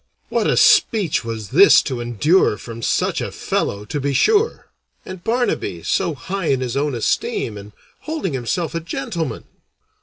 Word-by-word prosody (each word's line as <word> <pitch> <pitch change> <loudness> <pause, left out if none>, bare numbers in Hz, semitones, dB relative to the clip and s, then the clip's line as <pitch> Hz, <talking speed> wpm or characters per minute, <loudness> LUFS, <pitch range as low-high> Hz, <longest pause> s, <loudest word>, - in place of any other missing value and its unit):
What - - 0
a - - +1
speech 200 - +4
was 115 -3 -6
this 185 +10 +7
to 125 -3 -4
endure 120 - +2
from 115 +1 -9
such - - 0
a - - -4
fellow, 100 +1 -2
to 145 +7 -4
be 140 0 -1
sure! 440 - +2 0.3
and 185 -2 -9
Barnaby 230 - -1
so 170 -5 0
high 185 +6 -4
in 135 -2 +1
his 125 -1 -3
own 145 -1 0
esteem, 110 -1 -1
and 100 0 -10 0.3
holding 305 - -4
himself 135 +8 -2
a 165 - -1
gentleman! 160 -4 -4
140 Hz, 160 wpm, -20 LUFS, 115-185 Hz, 0.3 s, this